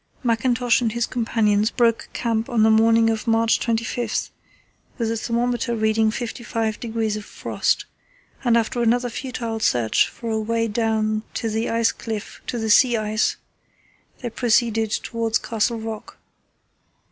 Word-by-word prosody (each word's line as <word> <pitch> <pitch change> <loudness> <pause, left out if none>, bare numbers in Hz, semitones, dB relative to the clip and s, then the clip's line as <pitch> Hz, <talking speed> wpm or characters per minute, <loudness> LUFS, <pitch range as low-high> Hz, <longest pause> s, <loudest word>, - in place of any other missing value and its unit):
Mackintosh 245 +1 +2
and 225 -3 0
his 235 0 0
companions 220 -3 +1
broke 230 -2 +1
camp 230 -1 -1
on 230 -3 +2
the 220 - +5
morning 225 +1 +4
of 220 +1 -4
March 225 0 +3
25, 235 +1 -1 0.7
with 230 -3 -1
the 230 - -1
thermometer 235 +1 -1
recording 220 0 +2
55° 225 -1 -2
of 210 - -7
frost, - - -1 0.6
and, 235 -2 +4
after 235 +2 0
another 240 +1 +2
futile 235 -3 -4
search 120 - +2
for 230 -1 -6
a 220 - 0
way 230 +1 0
down 215 -1 0 0.2
the 225 0 -1
ice 230 0 +2
cliff 220 -3 -6
to 245 - -2
the 220 -2 0
sea 240 +1 +5
ice, 215 0 0 0.9
they 240 -2 -4
proceeded 225 -2 +1
towards 225 +1 -1
Castle 230 +1 -1
Rock. 220 -1 -7
225 Hz, 140 wpm, -22 LUFS, 220-235 Hz, 0.9 s, the